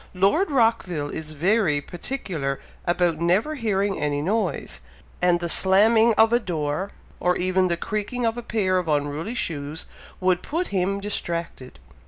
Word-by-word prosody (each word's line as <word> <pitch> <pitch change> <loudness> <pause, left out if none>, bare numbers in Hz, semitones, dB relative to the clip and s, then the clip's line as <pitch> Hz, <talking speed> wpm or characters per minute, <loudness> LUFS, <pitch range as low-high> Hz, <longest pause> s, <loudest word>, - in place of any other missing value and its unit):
"Lord 200 - +3
Rockville 225 - +1
is 155 -1 -6
very 175 -1 +2
particular 165 - -4 0.3
about 175 -2 +1
never 185 - +2
hearing 205 -7 0
any 145 -1 0
noise, 185 0 -2 0.4
and 175 -1 +3
the 175 - -2
slamming 220 +6 +4
of 225 +2 +5
a 240 - +5
door, 170 -2 -2 0.3
or 180 0 +1
even 185 +1 +2
the 170 -1 0
creaking 215 +6 -2
of 225 0 +1
a 240 - -4
pair 195 -6 +1
of 180 - -4
unruly 150 +8 -1
shoes, 150 -6 -3 0.3
would 185 -1 +2
put 340 +4 -2
him 195 +1 0
distracted." 170 -9 -4
185 Hz, 150 wpm, -24 LUFS, 165-220 Hz, 0.4 s, of